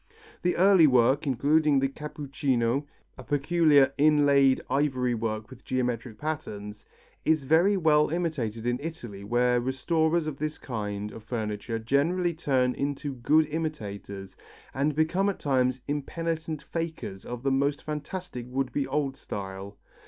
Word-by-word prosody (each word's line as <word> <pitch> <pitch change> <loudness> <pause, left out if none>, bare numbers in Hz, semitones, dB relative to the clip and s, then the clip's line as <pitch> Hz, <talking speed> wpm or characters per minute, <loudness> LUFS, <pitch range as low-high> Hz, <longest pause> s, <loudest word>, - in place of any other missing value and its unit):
The 180 - +1
early 185 -3 +6
work, 130 +3 +3
including 145 +3 +3
the 135 0 +2
cappuccino, 140 -3 -2 0.3
a - - -8
peculiar 145 -1 +3
inlaid 140 -3 +5
ivory 130 -3 +1
work 110 0 -3
with 130 -1 -13
geometric 120 -3 -2
patterns, 105 -9 -5 0.4
is 155 -2 +2
very 170 +8 +4
well 150 -3 +4
imitated 145 -10 -2
in 120 +1 0
Italy 120 -11 -7
where 120 +3 +2
restorers 160 +6 +1
of 155 -3 -4
this 155 0 -3
kind 105 -4 -4
of 110 - -10
furniture 110 -1 -3
generally 160 +10 +1
turn 130 -5 +1
into 140 +1 -3
good 150 +6 +3
imitators, 105 -11 -5 0.4
and 140 +2 0
become 175 +6 +2
at 200 - -3
times 130 -2 +1
impenitent 160 +1 -3
fakers 160 - -5
of 120 0 -7
the 135 - +1
most 140 +2 +1
fantastic 150 -3 -5
would 130 0 -1
be 140 -2 -1
old 140 -3 -1
style. 100 -1 -7
140 Hz, 135 wpm, -27 LUFS, 120-155 Hz, 0.4 s, early